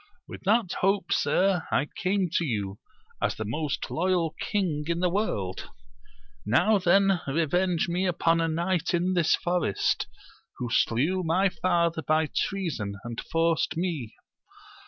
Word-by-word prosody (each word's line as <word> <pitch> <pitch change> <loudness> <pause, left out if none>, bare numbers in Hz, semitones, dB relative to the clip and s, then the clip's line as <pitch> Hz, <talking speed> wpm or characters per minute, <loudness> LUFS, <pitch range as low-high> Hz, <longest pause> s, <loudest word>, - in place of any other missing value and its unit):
— - - -41
With - - -9
that 215 -1 +2
hope, 195 +1 +1
sir, 190 -2 +1
I 140 - +1
came 185 +2 -1
to - - +2
you, 105 -8 -3 0.4
as - - 0
the 110 - -4
most 145 +7 -3
loyal 175 -2 +1
king 175 -8 -1
in 170 0 0
the 180 -1 +1
world: 100 - -2 0.7
now 205 - +3
then 190 0 +3
revenge 170 +4 +1
me 180 +2 0
upon 165 -1 +2
a 165 - +1
knight 170 +1 0
in 180 +2 +1
this 175 -3 +3
forest, 175 - 0 0.5
who 120 -2 -4
slew 150 +13 +2
my 180 +4 +2
father 170 -3 0
by 155 0 +1
treason, 155 - -2
and 120 0 -5
forced 165 -1 +1
me. 160 - -3
170 Hz, 145 wpm, -27 LUFS, 150-185 Hz, 0.7 s, now